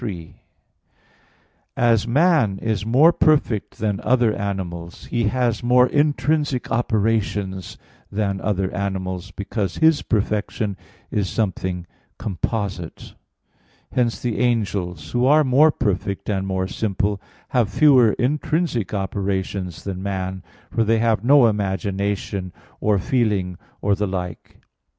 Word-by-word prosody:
3: 90 -9 -6 1.4
As 115 -2 +3
man 140 - +3
is 110 0 -2
more 145 +9 +6
perfect 145 -11 +1
than 105 -2 -1
other 120 -3 +2
animals, 90 -4 -5
he 115 -1 -1
has 120 +2 0
more 125 +1 +5
intrinsic 145 -1 0
operations 105 -5 -1 0.3
than 100 -2 -1
other 95 -3 -1
animals, 95 -1 -3
because 100 0 -4
his 160 -2 +4
perfection 105 -1 -1 0.4
is 100 -3 0
something 95 -4 -2 0.3
composite. 95 -2 -4 0.8
Hence 120 -2 0
the 120 -3 -2
angels, 95 -9 -1
who 125 +1 +2
are 150 +2 +6
more 145 +4 +5
perfect 100 -6 -2
and 95 -1 -1
more 95 -1 -1
simple, 100 -1 -1 0.3
have 120 -5 +2
fewer 125 -2 +5
intrinsic 150 - -1
operations 95 -2 -3
than 95 -2 -5
man, 95 -1 -3 0.3
for 115 - +1
they 115 +1 +2
have 110 -2 +1
no 135 0 +6
imagination, 100 -2 -1 0.3
or 105 -1 +2
feeling, 100 -4 0 0.3
or 100 - +3
the 105 +1 0
like. 90 -3 -6
105 Hz, 120 wpm, -22 LUFS, 95-120 Hz, 1.4 s, more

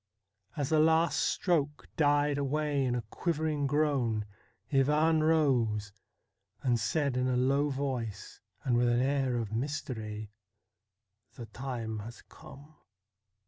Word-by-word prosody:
As 145 -2 -1
the 160 -1 +3
last 160 +2 +3
stroke 150 -5 0
died 145 -1 +2
away 145 0 0
in 125 -1 0
a 120 - -2
quivering 155 -4 -1
groan 135 -7 +1 0.5
Ivan 150 +4 +3
rose, 125 -10 +2 0.7
and 120 -3 +2
said 140 +4 0
in 125 0 +1
a 125 -1 +1
low 140 +3 +2
voice, 130 -7 -4 0.2
and 125 -3 +1
with 120 0 +3
an 120 0 +2
air 135 -1 +1
of 110 -2 -3
mystery: 110 -5 -4 0.5
' 100 0 -48
The 120 - -6
time 115 -3 -5
has 115 +3 -9
come.' 145 +3 -15
135 Hz, 130 wpm, -30 LUFS, 115-150 Hz, 0.7 s, the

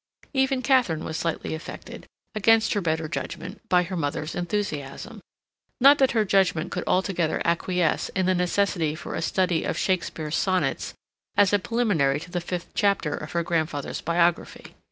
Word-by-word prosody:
Even 265 -1 +1
Katharine 240 - +2
was 160 - -5
slightly 165 -1 -2
affected 160 +2 -8 0.3
against 225 +1 +3
her 205 - 0
better 160 -2 -1
judgment 165 - -6
by 180 -1 +4
her 185 +2 -5
mother's 150 0 -2
enthusiasm. 175 +2 -4 0.6
Not 280 +3 +7
that 265 -3 +3
her 220 -2 +2
judgment 185 -4 +2
could - - -3
altogether 180 -3 +1
acquiesce 170 0 +1
in 190 -1 +1
the 185 - +3
necessity 180 -3 0
for 155 - -7
a - - -2
study 180 0 +1
of - - -2
Shakespeare's 165 -4 -1
sonnets 185 -1 0 0.4
as 205 -1 +4
a 205 - +4
preliminary 185 - +1
to 175 +1 -11
the 175 - -2
fifth 175 0 -5
chapter 200 -7 +1
of 150 - -6
her 170 0 +1
grandfather's 160 -4 -2
biography. 170 +1 0
180 Hz, 160 wpm, -25 LUFS, 160-205 Hz, 0.6 s, Not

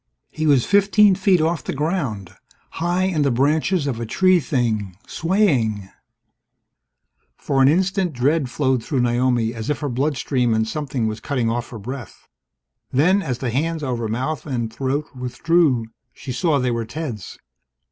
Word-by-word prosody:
He 155 0 -2
was 140 -5 +4
fifteen 205 0 +5
feet 190 -1 +3
off 160 0 0
the - - -4
ground, 135 - -2 0.5
high 175 +2 +1
in 185 -5 0
the 140 - +3
branches 150 +6 +1
of 130 -5 -2
a 115 - -3
tree 185 - +4
thing, 110 - -1
swaying 135 - 0 1.5
For 135 -2 0
an 130 - +6
instant, 185 +3 +2
dread 140 +2 +1
flowed 130 -2 0
through 135 -5 -1
Naomi 120 -1 +1
as 115 +3 -6
if 150 - 0
in - - -16
her 145 - -2
bloodstream 130 -3 0
and 110 0 +1
something 135 -3 -3
was 110 0 -2
cutting 125 -5 -1
off 120 +1 -3
her 120 - -8
breath. 120 +1 -8 0.6
Then, 180 +10 +3
as 130 -9 -3
the 125 -2 -3
hands 160 +5 -1
over 120 -4 -2
mouth 130 +7 -3
and 120 -5 -3
throat 140 +3 -1
withdrew, 130 +1 +1 0.3
she 135 - -8
saw 150 +4 +1
they 125 -2 0
were 115 -1 -2
Ted's. 120 - -6
135 Hz, 165 wpm, -21 LUFS, 120-160 Hz, 1.5 s, an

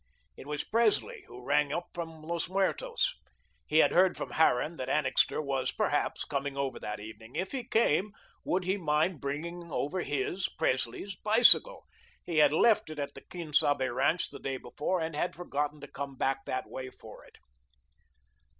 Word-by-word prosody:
It - - -11
was 150 0 -2
Presley, 230 -1 +1
who 125 0 -11
rang 145 0 +2
up 170 +3 -3
from 165 -2 -7
Los 170 +1 -2
Muertos. 465 - 0 0.5
He 155 - +1
had - - +6
heard 185 +1 +4
from - - -5
Harran 160 +1 +2
that 130 0 -4
Annixter 135 -1 +2
was, 135 -3 -1
perhaps, - - 0
coming 140 0 -3
over 140 -1 -2
that 105 0 -5
evening. 110 +3 -11
If 190 +1 -2
he 265 -3 -3
came, 210 - +2 0.3
would 185 +1 0
he 190 +3 0
mind 155 -1 +1
bringing 170 +4 -5
over 175 +7 -1
his 145 +7 -1
Presley's 130 +6 -1
bicycle. 235 - +5 0.4
He 170 -3 -2
had 150 - +6
left 215 +4 +4
it 155 - -7
at 145 -1 -3
the - - -11
Quien 170 -4 -8
Sabe 140 -3 +3
ranch 140 +7 +1
the - - -9
day 135 -1 -3
before 150 +9 -2
and 160 -1 -3
had 165 +1 -1
forgotten 150 -3 -3
to - - -8
come 140 -1 -6
back 135 +1 0
that 130 - -3
way 130 0 -6
for - - -13
it. - - -19
155 Hz, 175 wpm, -30 LUFS, 140-180 Hz, 0.5 s, had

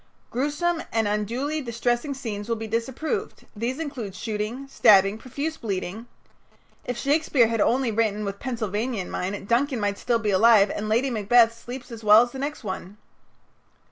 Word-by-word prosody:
"Gruesome 295 +7 0
and 225 -2 +1
unduly 240 +9 -1
distressing 240 +2 -1
scenes 215 -4 -5
will 230 - +1
be 225 0 -5
disapproved. 265 - -3
These 235 +5 -2
include 270 - -5
shooting, 220 +6 -4
stabbing, 205 -5 +5
profuse 285 +6 -4
bleeding 205 +1 -4 0.4
" - - -35
If 245 -1 -3
Shakespeare 280 -4 +2
had 230 -2 0
only 255 -1 +2
written 215 -1 0
with 200 0 -5
Pennsylvania 230 -2 -2
in 185 - -5
mind, 195 +2 -4
Duncan 250 +2 +1
might 205 -1 0
be - - -15
still 230 -2 0
alive 210 0 +5
and 215 +1 -4
Lady 245 +5 +2
Macbeth 230 +1 +4
sleep 245 +2 -8
as 230 -1 -9
well 215 +2 +8
as 245 - -5
the 265 - -7
next 285 0 -4
one. 190 0 -6
230 Hz, 170 wpm, -25 LUFS, 210-260 Hz, 0.4 s, well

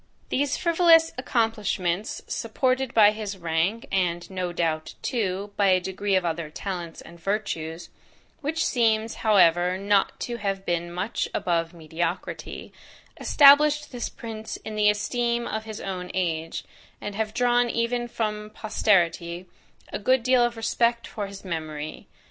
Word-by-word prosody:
These 280 0 0
frivolous 335 -2 +5
accomplishments, 215 -6 -1
supported 260 -1 0
by 210 -2 +7
his 210 -2 -5
rank, 170 +6 -1
and, 175 -3 0
no 185 -2 -2
doubt, 160 -2 -2
too, 200 -3 -2
by 200 - +3
a 185 -1 +5
degree 190 +2 -1
of 185 -1 +2
other 165 -2 -2
talents 175 0 -5
and 170 +1 -13
virtues, 170 -4 -3 0.5
which 315 +2 -1
seems, 225 -2 +2
however, 180 -4 +4
not 200 0 +1
to 240 -1 -3
have 195 -3 -3
been 170 0 -1
much 185 +6 -2
above 165 -1 0
mediocrity, 165 +2 -4 0.5
established 295 +1 +6
this 245 -3 -4
prince 220 -1 -7
in 220 - -5
the 210 0 +4
esteem 235 +3 0
of 220 0 -4
his 220 -1 -7
own 180 -2 -5
age, 165 -3 -2 0.4
and 205 - -5
have 215 +1 -2
drawn 245 0 +3
even 240 +1 -1
from 210 -2 -3
posterity, 175 -5 +1 0.5
a - - -2
good 255 +3 +2
deal 255 0 +4
of 240 -1 0
respect 235 +1 +1
for 205 -2 -5
his 195 0 -11
memory. 155 -3 -5
205 Hz, 145 wpm, -25 LUFS, 175-235 Hz, 0.5 s, by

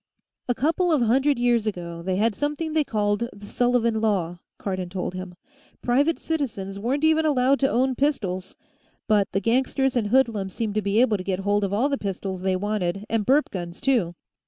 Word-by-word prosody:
"A 245 - +2
couple 330 +6 +1
of 295 -6 +3
hundred 265 +4 +3
years 240 -2 +2
ago, 170 -4 -4
they 185 +2 -1
had 215 +3 +2
something 295 +5 -2
they 310 -1 +3
called 210 -1 -1
the 205 0 -12
Sullivan 235 0 +1
Law," 180 -6 0 0.2
Cardon 185 -2 -4
told 180 0 -4
him. 185 -1 -7 0.5
"Private 280 +7 +2
citizens 210 -11 -3
weren't 260 +8 -1
even 315 0 +4
allowed 275 -2 +3
to 270 - +2
own 260 +2 +2
pistols. 200 -10 -1 0.5
But 210 -2 +3
the 195 - +1
gangsters 260 +4 +1
and 225 -4 +1
hoodlums 220 -5 +1
seemed 220 -3 -2
to 215 - 0
be 200 +2 +1
able 225 -5 +3
to 185 - -6
get 190 0 -2
hold 205 +1 +1
of 195 - -1
all 220 +7 +2
the 280 -1 -1
pistols 190 -1 -4
they 190 0 +1
wanted, 195 -1 -2
and 225 -3 0
burp 285 +3 +3
guns, 175 -2 -6
too. 220 -11 +1
220 Hz, 195 wpm, -24 LUFS, 195-265 Hz, 0.5 s, even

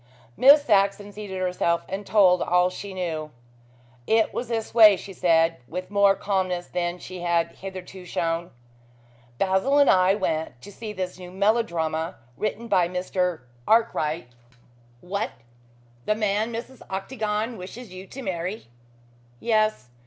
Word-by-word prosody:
Miss 285 +3 +7
Saxon 200 -1 +2
seated 205 -2 -6
herself 180 -2 0
and 195 +1 -5
told 185 -4 +5
all 180 +1 +3
she 200 +2 -7
knew. 165 -5 -3 0.8
"It 220 0 +3
was 245 - -3
this 225 -1 -3
way," 215 -4 +8
she 195 +2 -9
said, 165 -2 +3
with 180 +6 -6
more 200 -1 +5
calmness 185 -3 -1
than 175 0 -2
she 180 +1 -9
had 170 -1 +1
hitherto 190 -1 -9
shown. 165 -1 -2 0.9
"Basil 195 - +2
and 285 - +6
I 185 +1 +4
went 160 - -2
to 205 - -10
see 215 +1 -7
this 185 -2 -5
new 180 -1 -9
melodrama 175 -6 0 0.2
written 215 - -3
by 185 -5 +3
Mr. 180 -1 -1 0.3
Arkwright 170 - +1 0.4
" - - -31 0.3
"What? 200 +4 -3 0.7
The 215 - +3
man 215 +1 0
Mrs. 240 +3 -7
Octagon 215 +3 -2
wishes 195 +2 -9
you 185 +1 -9
to 270 +6 -9
marry?" 185 +1 -4 0.7
"Yes. 215 - +1
190 Hz, 140 wpm, -25 LUFS, 180-215 Hz, 0.9 s, way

